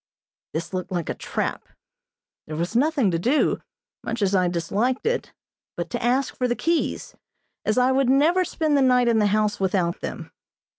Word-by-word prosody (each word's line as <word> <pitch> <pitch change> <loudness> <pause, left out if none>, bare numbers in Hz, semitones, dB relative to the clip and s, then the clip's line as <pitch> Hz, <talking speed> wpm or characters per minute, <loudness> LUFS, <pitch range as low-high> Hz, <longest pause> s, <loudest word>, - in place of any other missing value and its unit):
This 165 +3 -4
looked 185 0 -4
like 175 -3 -2
a - - 0
trap. - - -4 0.8
There 155 - -5
was 170 +7 -3
nothing 275 - +2
to 165 - 0
do, 260 - +1 0.4
much 230 -2 -2
as 195 0 +1
I 185 -2 +3
disliked 200 +9 -1
it, 480 +2 -1 0.5
but 170 -1 -4
to - - -3
ask 255 +3 +1
for 250 - 0
the 240 - 0
keys, 335 +4 -1 0.5
as 215 - +1
I 255 +1 +4
would 265 -1 +2
never 315 +8 +4
spend 315 -4 0
the 280 - +4
night 250 -2 +4
in 230 -2 +3
the 210 - +3
house 210 0 +1
without 185 -2 0
them. - - -6
235 Hz, 185 wpm, -24 LUFS, 185-270 Hz, 0.8 s, I